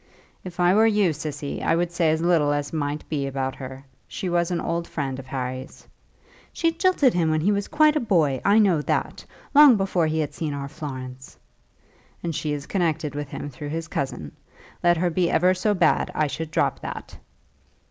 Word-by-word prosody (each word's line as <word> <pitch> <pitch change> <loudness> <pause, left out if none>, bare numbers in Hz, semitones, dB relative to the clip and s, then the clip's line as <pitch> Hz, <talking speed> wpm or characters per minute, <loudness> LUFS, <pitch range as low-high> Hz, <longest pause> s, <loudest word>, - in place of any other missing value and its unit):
"If 180 -1 -9
I 175 +1 +4
were 220 +2 +5
you, 205 -6 +2
Cissy, 150 -1 -5
I - - +2
would 175 +1 0
say 170 -2 +1
as 160 +1 0
little 165 -4 +3
as 145 +1 -2
might 145 -1 -3
be 140 -3 -2
about 135 -1 -2
her. 130 +1 -9 0.2
She 185 - -4
was 175 -1 +1
an 175 -2 -1
old 170 0 -2
friend 135 -3 -4
of 130 - -10
Harry's 130 0 -6 0.3
" - - -29
"She 330 0 +1
jilted 330 -6 +2
him 170 -2 +1
when 155 0 +1
he 195 +6 +2
was 200 -1 -1
quite 305 0 +4
a - - +3
boy; 160 - +1
I 200 +2 +4
know 190 -8 +4
that; - - -2 0.3
long 290 -3 +8
before 190 -4 +1
he 155 +1 -1
had 155 -2 -2
seen 150 -3 -3
our 140 0 -5
Florence." 130 -4 -8 0.9
"And 170 -1 -2
she 150 0 -2
is 145 -1 -4
connected 160 -6 -1
with 145 0 -4
him 145 - -6
through 145 +3 -7
his 165 +2 -4
cousin. 125 - -4 0.5
Let 175 -1 +4
her 175 +1 +1
be 175 +1 +1
ever 180 +3 +3
so 205 +3 0
bad, 170 -4 +2
I 155 - +2
should 160 +2 -4
drop - - 0
that." - - -8
160 Hz, 205 wpm, -24 LUFS, 145-180 Hz, 0.9 s, long